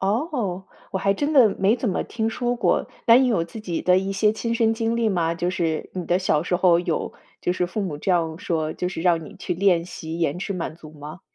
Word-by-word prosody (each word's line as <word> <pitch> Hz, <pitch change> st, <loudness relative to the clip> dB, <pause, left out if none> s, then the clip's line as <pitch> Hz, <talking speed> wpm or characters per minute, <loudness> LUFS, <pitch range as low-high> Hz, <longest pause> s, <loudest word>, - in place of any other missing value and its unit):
哦， 205 Hz, -, -1 dB, 0.3 s
我 190 Hz, -, -2 dB
还 195 Hz, +1 st, +2 dB
真 290 Hz, +7 st, -1 dB
的 255 Hz, -7 st, +7 dB
没 200 Hz, +5 st, +3 dB
怎 235 Hz, -2 st, -2 dB
么 185 Hz, -, 0 dB
听 225 Hz, -1 st, -2 dB
说 245 Hz, +1 st, -1 dB
过。 235 Hz, -, +1 dB, 0.2 s
那 230 Hz, +1 st, +8 dB
你 260 Hz, -1 st, +4 dB
有 180 Hz, -8 st, +1 dB
自 215 Hz, +6 st, -9 dB
己 175 Hz, -6 st, -3 dB
的 180 Hz, 0 st, +4 dB
一 195 Hz, +1 st, -2 dB
些 210 Hz, +2 st, +2 dB
亲 230 Hz, +1 st, -3 dB
身 225 Hz, -1 st, +2 dB
经 230 Hz, +1 st, -1 dB
历 230 Hz, -2 st, +2 dB
吗？ 170 Hz, -4 st, 0 dB
就 175 Hz, +1 st, -1 dB
是 165 Hz, -4 st, -2 dB
你 180 Hz, -2 st, -4 dB
的 175 Hz, +2 st, +2 dB
小 155 Hz, -5 st, +1 dB
时 180 Hz, 0 st, 0 dB
候 175 Hz, -2 st, +4 dB
有 175 Hz, -2 st, -2 dB, 0.3 s
就 180 Hz, -, 0 dB
是 180 Hz, -, 0 dB
父 210 Hz, +4 st, -4 dB
母 175 Hz, -7 st, -3 dB
这 185 Hz, -, -2 dB
样 165 Hz, -2 st, +1 dB
说， 160 Hz, -3 st, -2 dB
就 180 Hz, -, -3 dB
是 180 Hz, -, -5 dB
让 170 Hz, -2 st, +2 dB
你 -, -, -12 dB
去 -, -, -3 dB
练 180 Hz, -2 st, +2 dB
习 165 Hz, -2 st, -7 dB
延 165 Hz, 0 st, 0 dB
迟 200 Hz, -, -3 dB
满 170 Hz, -3 st, -4 dB
足 155 Hz, -2 st, -13 dB
吗？ 150 Hz, +3 st, -10 dB
185 Hz, 270 characters per minute, -23 LUFS, 170-220 Hz, 0.3 s, 那